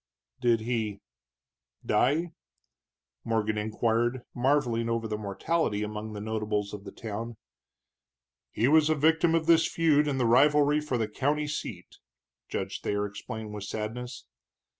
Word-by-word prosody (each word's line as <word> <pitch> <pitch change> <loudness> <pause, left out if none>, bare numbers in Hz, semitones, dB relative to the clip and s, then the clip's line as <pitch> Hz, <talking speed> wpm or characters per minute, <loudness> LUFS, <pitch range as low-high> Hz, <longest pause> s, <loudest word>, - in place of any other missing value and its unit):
"Did 120 -3 +3
he 110 -3 -2 0.9
die?" 150 +10 +2 0.9
Morgan 110 -2 0
inquired, 115 +3 0
marveling 120 -3 +1
over 115 -1 -1
the 110 - -2
mortality 105 - -1
among 105 +1 -5
the 105 - -5
notables 105 -1 -2
of 100 -1 -8
the - - -7
town. 115 +1 -6 1.1
"He 115 - +1
was 155 +1 +5
a 155 - +3
victim 160 +2 +3
of 165 -1 +1
this 165 0 +5
feud 150 -3 +3
in 140 -2 0
the 125 - +1
rivalry 145 +5 +5
for 150 -5 -2
the 110 -2 0
county 145 +7 0
seat," 110 -11 -6 0.5
Judge - - -3
Thayer 100 0 -1
explained, 105 +1 -7
with 105 -1 -5
sadness. 115 +5 -5
115 Hz, 140 wpm, -28 LUFS, 105-145 Hz, 1.1 s, was